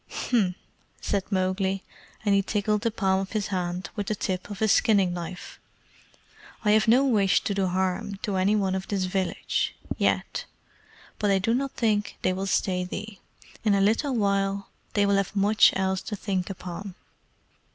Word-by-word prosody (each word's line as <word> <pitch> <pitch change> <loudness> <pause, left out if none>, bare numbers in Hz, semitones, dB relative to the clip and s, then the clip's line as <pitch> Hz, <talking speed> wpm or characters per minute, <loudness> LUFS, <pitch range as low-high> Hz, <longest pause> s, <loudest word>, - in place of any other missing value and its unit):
"H'm!" 200 -8 0 0.4
said 200 0 -2
Mowgli, 190 0 0 0.4
and 205 - +4
he 200 - +4
tickled 210 +1 0
the 230 - +1
palm 190 -4 +1
of 195 +2 -5
his 210 -2 -1
hand 180 -1 -3
with 205 -1 -3
the 215 - 0
tip 185 -1 -3
of 205 - -6
his 220 0 +2
skinning 195 -5 +3
knife; 175 +1 -7 1.1
"I 210 - +5
have 215 +1 +4
no 250 +5 +5
wish 205 -7 +3
to 205 - -1
do 195 -1 +1
harm 190 +3 -1
to 200 -3 -1
any 195 +3 +3
one 195 -3 +1
of 190 0 -3
this 195 -2 -1
village 185 0 -1 0.2
YET. - - 0 0.7
But 210 - +1
I 195 - +4
do 210 +5 +1
not 270 +2 -1
think 210 -3 0
they 185 - +2
will 190 +1 -3
stay 185 -1 +1
thee. 200 +2 -6 0.4
In 210 -3 +3
a - - +2
little 230 +7 +2
while 200 -2 0 0.3
they 205 -1 +4
will 200 0 +3
have 195 +1 -1
much 205 +2 +5
else 190 0 0
to 210 - -5
think 190 -2 -2
upon. 185 0 -7
195 Hz, 180 wpm, -26 LUFS, 190-210 Hz, 1.1 s, I